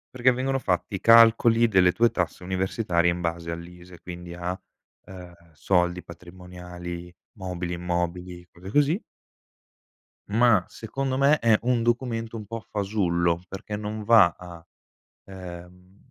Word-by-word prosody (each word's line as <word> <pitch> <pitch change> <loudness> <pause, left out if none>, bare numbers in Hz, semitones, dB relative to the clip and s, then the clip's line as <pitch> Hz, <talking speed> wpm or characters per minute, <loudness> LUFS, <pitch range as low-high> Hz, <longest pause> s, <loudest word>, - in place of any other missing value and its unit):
Perché 130 +1 +4
vengono 135 +2 -1
fatti 90 -2 -2
i 95 - -2
calcoli, 115 0 +6
delle 95 -4 +4
tue 115 +5 +2
tasse 90 0 -3
universitarie, 95 -1 0
in 85 - -2
base 85 -1 -3
all'ISEE, 85 +1 -9
quindi 90 0 -9
a 90 +1 -3 0.5
ehm, 90 -2 -11 0.2
soldi, 90 +2 0
patrimoniali, 90 0 -9 0.3
mobili, 90 -2 -4
immobili, 90 0 -4
cose 90 +2 -11
così 145 - +2 1.3
ma, 110 -2 +4
secondo 130 +4 -4
me, 140 +2 +4
è 115 -2 +4
un 120 -1 +1
documento 115 -1 -1
un 110 - -8
po' 115 +2 -6
fasullo, 85 -5 0
perché 95 +2 -7
non 105 +1 -5
va 110 -7 +6
a, 85 -2 -12 0.6
ehm, 90 0 -11
90 Hz, 130 wpm, -25 LUFS, 90-115 Hz, 1.3 s, calcoli